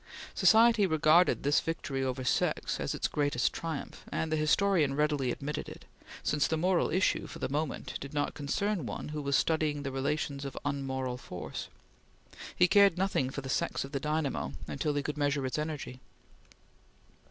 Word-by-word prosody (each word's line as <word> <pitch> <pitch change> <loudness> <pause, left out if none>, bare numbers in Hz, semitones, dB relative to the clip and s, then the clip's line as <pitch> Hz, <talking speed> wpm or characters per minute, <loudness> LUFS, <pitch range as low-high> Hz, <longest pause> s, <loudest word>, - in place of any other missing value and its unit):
Society 225 -2 +5
regarded 160 +2 +4
this 145 +2 +4
victory 140 -5 -3
over 130 0 -2
sex - - 0
as - - -2
its - - 0
greatest 145 -4 0
triumph, 160 -3 -5
and 160 - -2
the - - +2
historian 155 -1 +2
readily 150 -3 +1
admitted 145 +4 -4
it, - - -12 0.4
since 150 -1 +1
the 160 - 0
moral 180 +2 +2
issue, 185 +4 +1
for - - -9
the - - -2
moment, 145 +2 -3
did 140 - -7
not 145 -1 -1
concern 185 +7 -1
one - - -5
who 150 0 -4
was 140 -1 0
studying 155 -2 +1
the 135 - -3
relations 140 +1 -2
of 140 -2 -6
unmoral 130 -3 -2
force. - - -6 0.9
He 180 - +5
cared 200 -1 +5
nothing 185 -9 +1
for 140 - -5
the 135 - -7
sex - - -1
of 135 - -8
the 140 - -2
dynamo 150 -1 -1
until 145 +1 -2
he 145 - 0
could 150 0 -4
measure 145 -1 +1
its 130 +3 -2
energy. 150 -4 -4
150 Hz, 175 wpm, -30 LUFS, 140-160 Hz, 0.9 s, Society